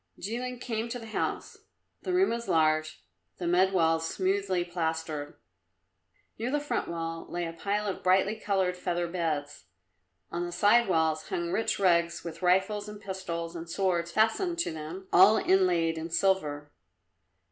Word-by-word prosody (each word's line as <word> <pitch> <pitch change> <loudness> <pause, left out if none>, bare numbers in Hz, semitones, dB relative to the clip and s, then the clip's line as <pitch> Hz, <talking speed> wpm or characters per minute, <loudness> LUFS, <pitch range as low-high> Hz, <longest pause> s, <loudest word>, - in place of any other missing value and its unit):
Jilin 245 +5 -4
came 230 -1 -3
to 245 - -3
the 230 - -9
house. 220 - -3 0.4
The - - -3
room 370 +2 +3
was 235 0 -3
large, 155 -1 +1 0.3
the 180 - -5
mud 180 +2 +3
walls 165 -3 +2
smoothly 190 -1 0
plastered. 160 -4 -3 1.0
Near 235 +2 -1
the 295 +2 +1
front 290 - -2
wall 165 -1 -4
lay 175 0 -2
a 165 - -5
pile 205 +5 -2
of 195 - -3
brightly 190 +3 +3
coloured 190 -4 0
feather 175 -1 -2
beds, 155 - -3 0.7
on 170 +1 -2
the 175 - -4
side 205 +6 +4
walls 160 -3 +1
hung 170 0 -2
rich 225 - 0
rugs 170 -3 +2
with 170 0 -7
rifles 190 +3 +2
and 210 0 -9
pistols 175 -4 -5
and 165 0 -7
swords 175 -2 0
fastened 225 - +1
to 340 - 0
them, 160 +5 -7
all 195 +5 +7
inlaid 175 -5 +2
in 165 +1 -5
silver. 155 -5 0
180 Hz, 160 wpm, -29 LUFS, 165-205 Hz, 1.0 s, all